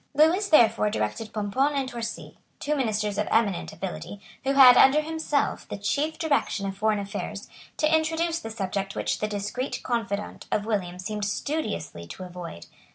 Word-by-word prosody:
Lewis 340 +7 +4
therefore 225 -7 +5
directed 105 - -3
Pomponne 255 +8 0
and 270 -2 0
Torcy, 235 -2 -6 0.2
two 300 - -1
ministers 210 -6 -1
of 210 - 0
eminent 210 -5 +1
ability, 175 +2 -6 0.2
who 270 +1 +1
had, 260 -3 +9
under 270 +4 +7
himself, 315 -2 -1
the - - -4
chief 290 +10 -1
direction 285 -9 0
of 195 0 -3
foreign 215 +1 +1
affairs, 200 0 -5 0.3
to 310 +1 +3
introduce 325 +1 0
the 225 - -7
subject 195 -2 -3
which - - -1
the 215 - 0
discreet 210 +6 -3
confidant 210 -4 -3
of 210 - 0
William 185 -5 -2
seemed 210 +2 -3
studiously 205 - -3
to 185 - -8
avoid. 175 - -8
215 Hz, 160 wpm, -26 LUFS, 200-280 Hz, 0.3 s, had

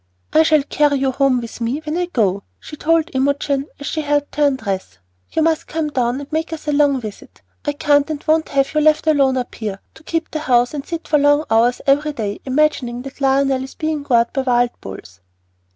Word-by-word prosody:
"I 315 - +6
shall 315 -2 +4
carry 295 0 +1
you 265 0 +1
home 265 -2 +2
with 235 +1 -9
me 235 +5 -1
when 305 +1 -2
I 355 0 -1
go," 205 - 0 0.2
she 300 - -10
told 330 +2 +1
Imogen 280 +1 0
as 285 - -7
she 310 - -2
helped 290 -1 -1
her 295 0 +4
undress. 200 - -3 0.3
"You 320 - +1
must 320 -1 +1
come 315 -1 -2
down 250 -1 0
and 285 - -9
make 320 +1 -2
us 315 -1 -7
a - - +2
good 285 - +1
long 285 -2 +3
visit. 215 -4 -10 0.2
I 290 - 0
can't 290 0 +2
and 300 -2 -4
won't 315 0 +2
have 275 +1 +1
you 305 - +2
left 310 +1 +3
alone 275 -4 +3
up 250 - -4
here, 205 -3 -5
to - - -17
keep 330 0 -3
the 310 - -2
house 245 -4 +2
and 290 -2 -4
sit 335 +2 -6
for 290 0 +3
hours 235 +2 +3
every 290 +2 +2
day 210 -6 -4
imagining 260 -3 0
that 275 +1 -10
Lionel 270 -1 +2
is 265 - -10
being 310 -2 -2
gored 240 -4 +2
by 270 - 0
wild 245 -2 +2
bulls." 95 -2 -10
280 Hz, 220 wpm, -19 LUFS, 250-305 Hz, 0.3 s, I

